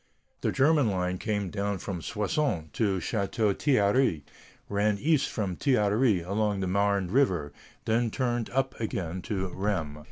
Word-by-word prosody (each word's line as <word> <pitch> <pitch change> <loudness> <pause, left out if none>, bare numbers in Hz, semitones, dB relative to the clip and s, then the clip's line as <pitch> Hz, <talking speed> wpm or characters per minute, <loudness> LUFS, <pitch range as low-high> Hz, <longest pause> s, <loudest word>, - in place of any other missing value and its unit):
The - - +1
German 145 -3 +3
line 90 -1 -1
came 105 -4 -2
down 100 -1 -1
from 90 -1 -5
Soissons 105 - -1
to 100 -4 +1
Château 100 +2 0
Thierry, 115 - +2 0.4
ran 105 0 +1
east 150 +4 +2
from 100 -5 -2
Château 125 -7 +2
Thierry 105 -3 +3
along 100 +3 -1
the 95 - -1
Marne 100 -1 +1
River, 90 - +1 0.3
then 115 +1 +1
turned 120 -1 -1
up 135 +1 0
again 95 -5 -3
to 95 0 -3
Rheims. 90 -7 -2
100 Hz, 150 wpm, -28 LUFS, 95-120 Hz, 0.4 s, German